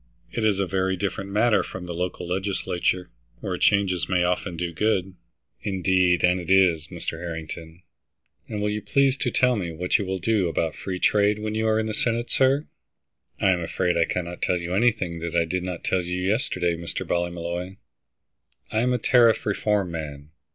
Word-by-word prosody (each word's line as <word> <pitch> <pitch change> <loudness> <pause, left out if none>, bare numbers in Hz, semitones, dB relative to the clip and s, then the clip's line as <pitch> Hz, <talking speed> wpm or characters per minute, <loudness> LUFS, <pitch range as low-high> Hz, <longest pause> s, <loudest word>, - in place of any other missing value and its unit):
It 115 - -2
is 105 -3 +3
a 100 - +1
very 95 0 0
different 100 0 -3
matter 105 +3 +3
from 90 -1 -7
the 90 - -5
local 90 0 -3
legislature, 90 -1 -1 0.3
where - - -3
changes 95 -4 +2
may 90 -2 +2
often 90 0 -1
do 85 0 -3
good." 95 -1 0 0.5
"Indeed 95 -3 +2
and 90 +1 +4
it 90 - -7
is, 90 -5 +4
Mr. 80 - -5
Harrington. 80 0 -7 0.7
And 105 -2 -3
will 105 - +1
you 105 0 -2
please 135 +5 +2
to - - 0
tell 125 -1 +3
me 90 -6 -3
what 90 +3 0
you 100 - -2
will 95 0 -1
do 100 0 +1
about 80 -1 -1
free 95 -2 -5
trade, 105 +2 +3
when 105 0 -3
you're 110 0 +1
in 110 - 0
the 110 - -3
Senate, 115 +1 -1
sir?" 135 +3 +3 0.7
"I 95 - +4
am 90 -1 +1
afraid 85 +1 0
I 85 - +3
cannot 90 0 -4
tell 90 - +1
you 85 +1 -4
anything 95 -5 +1
that 85 0 -4
I 85 -1 +3
did 90 +3 -2
not 90 -2 -5
tell 95 - +1
you 90 +1 -3
yesterday, 90 -3 0
Mr. 85 0 -5
Ballymolloy. 85 +1 -2 1.0
I 110 - +1
am 125 +2 +2
a - - +2
tariff 115 -1 +4
reform 100 -3 0
man. 75 -2 -6
95 Hz, 190 wpm, -25 LUFS, 85-105 Hz, 1.0 s, and